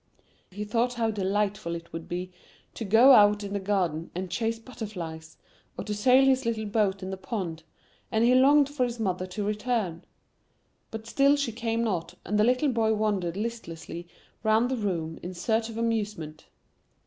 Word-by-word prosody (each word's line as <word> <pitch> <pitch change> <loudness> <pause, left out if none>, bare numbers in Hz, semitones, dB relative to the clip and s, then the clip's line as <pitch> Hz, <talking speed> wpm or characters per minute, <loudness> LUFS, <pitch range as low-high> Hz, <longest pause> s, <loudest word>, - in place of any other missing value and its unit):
He 205 +3 -6
thought 235 +3 0
how 225 -2 0
delightful 200 -3 -1
it 170 0 -10
would 165 0 -7
be 180 +1 -4 0.4
to - - -5
go 225 +6 +7
out 210 -3 +6
in 200 0 -5
the 200 - -1
garden 180 -5 -1
and 180 0 -4
chase 225 +4 -1
butterflies, 180 -10 -8 0.4
or - - -3
to 210 - -3
sail 255 +6 +5
his 265 -1 +3
little 225 -2 -1
boat 205 -2 0
in 190 - -4
the 190 - -4
pond, 185 -5 -4 0.5
and 220 +1 +2
he 245 - +5
longed 280 +2 +6
for 285 -2 -1
his 240 -1 -2
mother 185 -3 -1
to 185 +3 -4
return; 210 -5 -1 0.9
but 220 0 -7
still 275 +4 +4
she 280 -5 -1
came 230 0 -1
not, 180 -5 -2
and 210 +3 0
the - - +5
little 255 +5 +3
boy 225 -3 +2
wandered 200 -5 -1
listlessly 175 -6 -6 0.3
round 220 +3 +2
the - - +1
room 170 -8 -3
in 180 +1 -7
search 220 +5 0
of 225 - -7
amusement. 210 -9 -3
210 Hz, 180 wpm, -27 LUFS, 185-230 Hz, 0.9 s, go